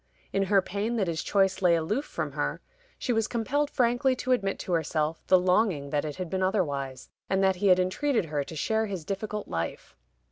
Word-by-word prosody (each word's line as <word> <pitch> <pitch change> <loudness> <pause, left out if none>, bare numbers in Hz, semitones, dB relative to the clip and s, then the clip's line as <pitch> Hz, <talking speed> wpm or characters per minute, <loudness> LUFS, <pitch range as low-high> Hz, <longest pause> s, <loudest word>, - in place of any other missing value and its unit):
In 195 - +2
her 195 0 +3
pain 205 +6 -2
that 210 -4 +1
his 165 -2 -2
choice 195 -1 +1
lay 175 -2 +5
aloof 210 - -1
from - - -4
her, - - -2 0.4
she 245 - -1
was 225 -1 +1
compelled 280 +5 0
frankly 245 +1 +2
to 255 0 -3
admit 195 -6 +1
to - - -6
herself 160 -1 0
the 185 - +7
longing 180 -6 +1
that 150 0 0
it 150 - -4
had 185 -1 -4
been 190 +3 -2
otherwise, 145 - -1 0.2
and 190 0 +2
that 190 -1 +3
he 200 +2 +1
had 185 -1 +7
entreated 205 - +1
her 150 -2 -2
to 160 - -9
share 220 +7 0
his 190 -6 -5
difficult 210 +3 -4
life. 85 0 -4
190 Hz, 210 wpm, -28 LUFS, 165-220 Hz, 0.4 s, the